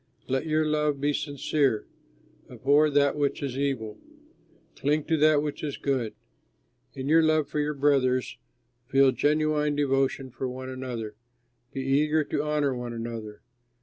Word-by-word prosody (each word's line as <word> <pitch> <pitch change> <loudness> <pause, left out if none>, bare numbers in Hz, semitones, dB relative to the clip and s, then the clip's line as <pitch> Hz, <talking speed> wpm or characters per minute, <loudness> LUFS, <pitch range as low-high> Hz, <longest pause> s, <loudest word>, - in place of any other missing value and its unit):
Let 135 +4 -1
your 155 0 +2
love 150 -2 0
be 145 +1 +1
sincere; 140 -4 0 0.6
abhor 145 +3 +3
that 140 -1 +3
which 145 -1 -1
is 135 -3 -3
evil, 130 -6 -2 0.8
cling 150 +2 0
to 160 +1 0
that 150 -1 +4
which 150 0 -5
is 145 -2 -3
good. 130 -6 -1 0.8
In 135 0 -5
your 160 +2 +5
love 155 -2 +2
for 150 - -3
your 150 0 -1
brothers, 135 -3 +1 0.5
feel 135 0 +4
genuine 150 +1 +1
devotion 135 -2 0
for 130 +1 -4
one 130 +1 -7
another. 125 -4 -5 0.6
Be 135 - -4
eager 150 +4 +2
to 145 - -2
honor 150 -3 0
one 120 -1 -5
another. 115 -2 -6
140 Hz, 150 wpm, -27 LUFS, 130-150 Hz, 0.8 s, your